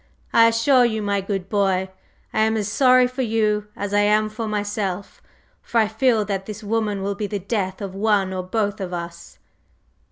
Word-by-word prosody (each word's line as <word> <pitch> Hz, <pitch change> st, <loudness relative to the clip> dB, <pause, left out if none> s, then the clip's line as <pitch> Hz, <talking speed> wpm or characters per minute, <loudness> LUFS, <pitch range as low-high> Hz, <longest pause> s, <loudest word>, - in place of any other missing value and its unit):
I 230 Hz, 0 st, +7 dB
assure 235 Hz, +3 st, +4 dB
you, 220 Hz, -3 st, 0 dB
my 200 Hz, -1 st, 0 dB
good 195 Hz, -1 st, -3 dB
boy, 195 Hz, -2 st, +1 dB, 0.5 s
I -, -, 0 dB
am 220 Hz, +1 st, +2 dB
as 210 Hz, -2 st, -1 dB
sorry 255 Hz, +3 st, +5 dB
for 255 Hz, +1 st, -3 dB
you 215 Hz, -3 st, 0 dB
as 205 Hz, 0 st, -4 dB
I 205 Hz, -, +4 dB
am 210 Hz, +1 st, +3 dB
for 220 Hz, +1 st, -5 dB
myself, 205 Hz, -2 st, -3 dB, 0.4 s
for 235 Hz, -, -3 dB
I 220 Hz, -2 st, +4 dB
feel 220 Hz, 0 st, +1 dB
that 195 Hz, -1 st, -3 dB
this 215 Hz, 0 st, -7 dB
woman 210 Hz, -2 st, -1 dB
will 200 Hz, +1 st, -1 dB
be 205 Hz, +1 st, -4 dB
the 205 Hz, -, -3 dB
death 195 Hz, -1 st, -3 dB
of 195 Hz, -2 st, -5 dB
one 200 Hz, -2 st, +1 dB
or 185 Hz, -, -2 dB
both 205 Hz, +2 st, -2 dB
of 180 Hz, -1 st, -4 dB
us!" 170 Hz, 0 st, -7 dB
210 Hz, 195 wpm, -22 LUFS, 195-220 Hz, 0.5 s, I